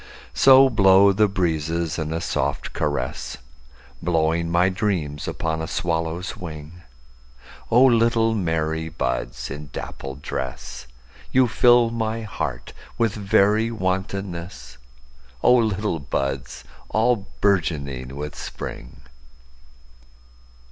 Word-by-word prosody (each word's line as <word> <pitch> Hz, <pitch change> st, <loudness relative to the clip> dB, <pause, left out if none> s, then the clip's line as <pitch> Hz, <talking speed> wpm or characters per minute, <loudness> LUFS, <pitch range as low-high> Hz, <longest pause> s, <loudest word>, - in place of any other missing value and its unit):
So 135 Hz, 0 st, +7 dB
blow 100 Hz, -4 st, +5 dB
the 105 Hz, +2 st, +3 dB
breezes 85 Hz, -3 st, -1 dB
in 80 Hz, 0 st, -3 dB
a 80 Hz, -, -1 dB
soft -, -, -2 dB
caress, 70 Hz, -4 st, -3 dB, 0.6 s
Blowing 85 Hz, 0 st, +1 dB
my 85 Hz, +2 st, +3 dB
dreams 90 Hz, -7 st, -2 dB
upon 80 Hz, -1 st, -2 dB
a 80 Hz, -, -4 dB
swallow's 85 Hz, +1 st, -2 dB
wing;O 75 Hz, -, -3 dB
little 115 Hz, -2 st, +3 dB
merry 80 Hz, -4 st, -1 dB
buds 60 Hz, -4 st, -3 dB
in 75 Hz, +1 st, -7 dB
dappled 70 Hz, +1 st, -7 dB
dress, 65 Hz, 0 st, -5 dB, 0.4 s
You 130 Hz, -1 st, +4 dB
fill 120 Hz, 0 st, +4 dB
my 115 Hz, 0 st, -2 dB
heart 65 Hz, -, -5 dB, 0.2 s
with 115 Hz, -3 st, +1 dB
very 105 Hz, +2 st, +2 dB
wantonness—O 75 Hz, -, -3 dB
little 105 Hz, -6 st, 0 dB
buds 70 Hz, -2 st, -3 dB, 0.3 s
all 110 Hz, -2 st, +1 dB
bourgeoning 70 Hz, -9 st, 0 dB
with 75 Hz, +1 st, -5 dB
Spring! -, -, -8 dB
85 Hz, 100 wpm, -23 LUFS, 70-105 Hz, 0.6 s, So